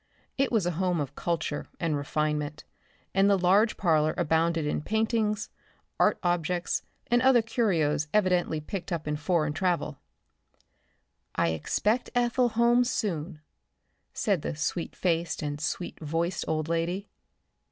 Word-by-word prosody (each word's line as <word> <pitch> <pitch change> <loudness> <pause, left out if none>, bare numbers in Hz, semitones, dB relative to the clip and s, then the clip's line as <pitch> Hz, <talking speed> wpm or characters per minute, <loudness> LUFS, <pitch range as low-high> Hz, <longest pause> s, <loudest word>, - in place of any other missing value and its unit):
It 275 0 +1
was 220 -7 +2
a 175 - +1
home 180 -2 +1
of 145 -1 -3
culture 160 -2 -2
and 165 -2 0
refinement, 150 +1 -2 0.5
and 195 +1 +4
the 200 - +4
large 195 +5 +3
parlor 155 -4 +2
abounded 165 -1 +1
in 150 - -1
paintings, 220 +1 0 0.5
art - - +4
objects 175 0 0 0.3
and 240 0 +4
other 255 -3 +5
curios 170 - +1
evidently 180 -6 +2
picked 180 +5 -6
up 165 -3 -3
in 150 - 0
foreign 155 0 0
travel. 170 -4 -1 1.4
"I - - +2
expect 210 - 0
Ethel 245 0 +2
home 235 +2 +4
soon," 180 -9 -2 0.7
said 195 -7 0
the 155 - -3
sweet 160 +2 -3
faced 170 -2 -1
and 145 0 -3
sweet 175 +2 -3
voiced 165 +3 -2
old 155 -1 -1
lady. 170 +4 -1
175 Hz, 135 wpm, -28 LUFS, 155-210 Hz, 1.4 s, other